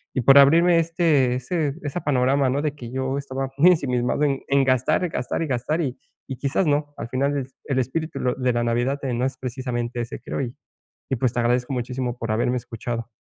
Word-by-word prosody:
y 130 - +1
por 135 +3 +7
abrirme 165 +5 +6
este, 165 -6 +2
ese 145 +3 -1
esa 145 +4 -3
panorama, 135 0 +2
¿no?, 140 +3 0
de 150 -1 -2
que 120 -5 -9
yo 130 +1 -2
estaba 135 -1 -4
muy 170 +6 +7
ensimismado 125 -4 0
en 140 -2 +1
en 140 0 +4
gastar, 130 +7 +2
gastar 125 -2 -3
y - - -3
gastar, 140 +5 -1
y 130 -5 -3 0.3
y 135 - -5
quizás 140 +7 0
no. 145 0 0
Al - - -6
final, 140 +3 0
el 135 - -1
es 130 - -32
el 135 -2 0
espíritu 155 +6 -2
lo 125 - 0
de 125 -1 0
la 120 0 0
Navidad, 120 +4 0
eh, 130 -2 -1
no 125 +2 0
es 130 0 -3
precisamente 120 -1 -3
ese, 120 - -6
creo. 130 - -4
Y 125 -2 -4 0.6
y, 135 - +1
pues, 120 0 0
te 120 - +1
agradezco 125 +2 +1
muchísimo 125 0 -3
por 115 -2 -2
haberme 120 +3 +1
escuchado. 115 -1 -5
130 Hz, 220 wpm, -23 LUFS, 125-145 Hz, 0.6 s, por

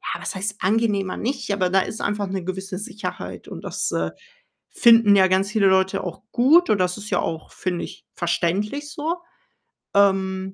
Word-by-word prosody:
ja, - - -6
was - - -3
heißt 200 +2 -2
„angenehmer“, 200 -1 +1
nicht 255 -2 -3
aber 185 -2 +1
da 190 +1 +3
ist 220 - -5
einfach 205 0 -1
'ne 190 -1 -4
gewisse 190 +1 -5
Sicherheit 210 0 -6
und - - -9
das, - - -2
äh, - - -1 0.6
finden 230 -3 +6
ja 190 -1 +6
ganz 190 +2 +1
viele 210 -3 +3
Leute 190 +1 +2
auch 180 - -6
gut 300 +9 +5
und 215 - +4
das 180 0 0
ist 210 0 -8
ja - - +1
auch, 160 -1 -4
finde 180 -2 -3
ich, - - -13
verständlich 195 - -1
so. 320 +3 -2 0.8
Ähm 190 -1 +2
195 Hz, 180 wpm, -23 LUFS, 190-215 Hz, 0.8 s, finden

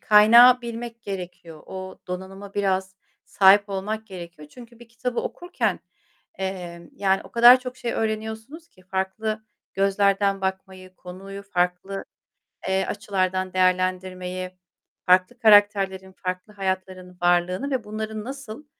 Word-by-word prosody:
kaynağı 235 +4 +7
bilmek 235 0 -7
gerekiyor. 180 -4 -8
O 185 0 -8
donanıma 190 +2 -7
biraz 190 -1 -1 0.3
sahip 200 +1 +5
olmak 210 +3 -4
gerekiyor. 170 -5 -10
Çünkü 235 +5 -14
bir 240 -1 -15
kitabı 240 +1 -3
okurken, 350 +1 -3 0.6
emm, 175 -3 -5
yani, 195 -1 +1
o - - -14
kadar 240 +2 +8
çok 255 0 -7
şey 240 -2 -3
öğreniyorsunuz 220 +8 -4
ki 185 - -23
farklı 195 +4 -3 0.3
gözlerden 195 0 +2
bakmayı, 190 -1 -5
konuyu 195 +2 -9
farklı, 180 0 -2 0.6
eee, 190 0 +1
açılardan 185 -1 -2
değerlendirmeyi, 185 0 -1 0.5
farklı 185 +7 +3
karakterlerin, 205 -4 +4
farklı 185 +3 -6
hayatların 185 -2 -4
varlığını 175 +9 +1
ve 260 -3 -1
bunların 215 0 -5
nasıl 270 +1 -8
195 Hz, 120 wpm, -24 LUFS, 185-220 Hz, 0.6 s, kadar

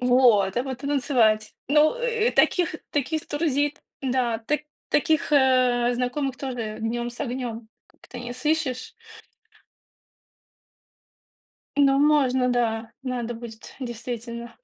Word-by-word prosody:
Вот! 245 -6 +4
А 245 - +2
потом 265 +1 -4
танцевать. 235 -6 +2 0.2
Ну, 300 - +4
э, 475 -2 +1
э, - - +1
таких 350 -3 +2
таких 300 +2 -1
друзей-то 290 -1 0 0.2
да, 250 -3 0
та 290 +7 -1 0.3
таких, 310 +1 +1
э, 255 -3 +4
знакомых 255 +2 -2
тоже 245 -5 -4
днем 240 +2 -2
с 240 - -11
огнем 240 -4 -4 0.2
как-то 245 - -12
не 245 0 -6
сыщешь. 260 -1 -1 2.8
Ну, 275 -1 +4
можно, 270 -4 +3
да, 225 -2 -1
надо 245 -2 -3
будет, 225 -1 -10
действительно, 235 -1 -6
250 Hz, 115 wpm, -25 LUFS, 235-285 Hz, 2.8 s, Вот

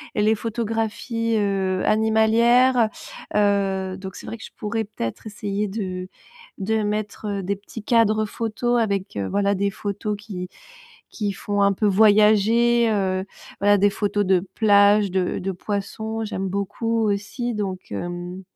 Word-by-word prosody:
et 210 - +1
les 220 +1 +4
photographies, 225 +1 -2
heu, 195 -2 0
animalières. 225 +3 +4 0.5
Heu, 195 -2 +1
donc, 190 0 -8
c'est - - -10
vrai 230 - -5
que - - -12
je - - -12
pourrais 220 +1 -2
peut-être 200 - -6
essayer 205 0 -3
de 185 -3 -4 0.5
de 220 +2 0
mettre 205 -1 -3
des 200 +2 -1
petits 205 +3 -10
cadres 215 -2 +3
photo 230 +3 -1
avec, 200 -4 -1
heu, 100 - -2
voilà 200 - +1
des 200 +1 0
photos 205 +1 -3
qui 190 -4 -7 0.6
qui 205 -3 -2
font 205 0 -2
un 200 0 +4
peu 210 - -1
voyager, 215 +3 +4
heu, 190 -2 0 0.4
voilà 205 +1 +4
des 205 +1 +4
photos 205 0 0
de 185 -1 +4 0.2
plages, 205 -2 +5
de 185 -1 0
de 195 +1 -2
poissons, 220 +4 -4
j'aime 195 -2 -3
beaucoup 225 +4 -1
aussi 210 +4 -2
donc 190 - -4
hem, 175 - -5
205 Hz, 150 wpm, -23 LUFS, 195-220 Hz, 0.6 s, plages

